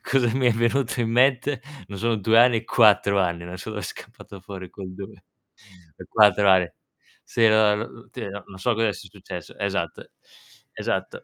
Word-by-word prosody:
cosa 130 -3 +1
mi 130 -1 +1
è 120 - +5
venuto 115 +2 0
in 115 -1 -1
mente, 130 +2 +2 0.3
non 100 -1 -8
sono 115 +2 0
2 110 +2 +3
anni, 120 -1 +5
4 100 -3 +4
anni, 85 -2 -1
non 90 +1 -8
so 110 - -7
dov'è 105 -1 -5
scappato 95 +2 -10
fuori 95 -1 -9
quel 95 -2 -9
2. 100 0 -11 0.9
4 105 -2 +5
anni. 90 -2 +4 0.5
Sì, 115 -1 +2
no, 110 -1 +4
n 115 +2 -8
ti 120 -5 -6
no 100 0 -8
non 95 - -13
so 120 +6 +1
cosa 115 -1 +1
sia - - -11
successo. - - -10
Esatto, - - -3 0.6
esatto. - - -4
110 Hz, 175 wpm, -24 LUFS, 95-115 Hz, 0.9 s, è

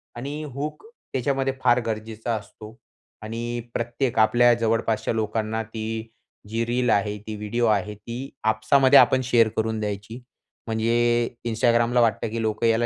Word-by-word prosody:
आणि 140 +5 -5
हुक 150 - -5 0.3
त्याच्यामध्ये 135 +1 0
फार 120 0 +5
गरजेचा 110 +1 -3
असतो 110 +1 -10 0.5
आणि 120 +2 -4
प्रत्येक 120 +1 -2
आपल्या 120 +2 +5
जवळपासच्या 115 -1 0
लोकांना 110 0 -1
ती 110 0 -5 0.4
जी 115 +1 -1
रील 125 +1 0
आहे, 105 -1 +1
ती 110 +1 -7
व्हिडिओ 105 +3 -1
आहे, 105 -1 0
ती 120 +6 -7
आपसामध्ये 130 +5 +5
आपण 130 - +4
शेअर 120 -3 +4
करून 110 0 0
द्यायची. 105 +2 -5 0.5
म्हणजे 120 +1 +1 0.2
Instagramला 120 +1 +2
वाटतं, 115 -1 +1
की 115 +1 -3
लोकं 110 +1 -1
याला 115 +1 +2
115 Hz, 140 wpm, -24 LUFS, 110-120 Hz, 0.5 s, फार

